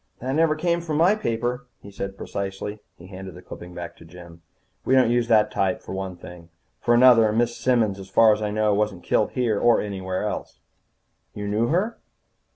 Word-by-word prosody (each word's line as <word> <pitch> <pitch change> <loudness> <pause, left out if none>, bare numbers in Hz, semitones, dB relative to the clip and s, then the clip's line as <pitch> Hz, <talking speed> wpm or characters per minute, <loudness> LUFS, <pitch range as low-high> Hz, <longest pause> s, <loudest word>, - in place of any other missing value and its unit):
"That 130 +2 -4
never 155 +1 +3
came 170 +2 0
from 160 -3 -3
my 175 +6 +5
paper," 125 - -2
he 100 - -13
said 100 0 -6
precisely. 100 +1 -5 0.2
He 85 - -14
handed 95 -1 -9
the 90 - -12
clipping 90 0 -10
back 85 -1 -7
to - - -15
Jim. 85 0 -13 0.4
"We 130 - +2
don't 130 -3 +4
use 120 -1 +1
that 105 -2 +4
type, 95 -3 0
for - - -7
one 95 -1 -4
thing. 85 -1 -12 0.3
For 120 - +2
another, 120 -3 +6
Miss 120 +2 0
Simmons, 115 -6 +1
so 95 - -8
far 110 +3 +5
as 105 - -4
I 105 - -1
know, 105 0 +1
wasn't 105 -3 -1
killed - - +1
here 115 -5 0
or 120 -1 +4
anywhere 95 -2 -4
else." 105 - -5 0.8
"You 105 0 -5
knew 110 +3 +1
her?" 195 - -1
105 Hz, 200 wpm, -24 LUFS, 95-120 Hz, 0.8 s, another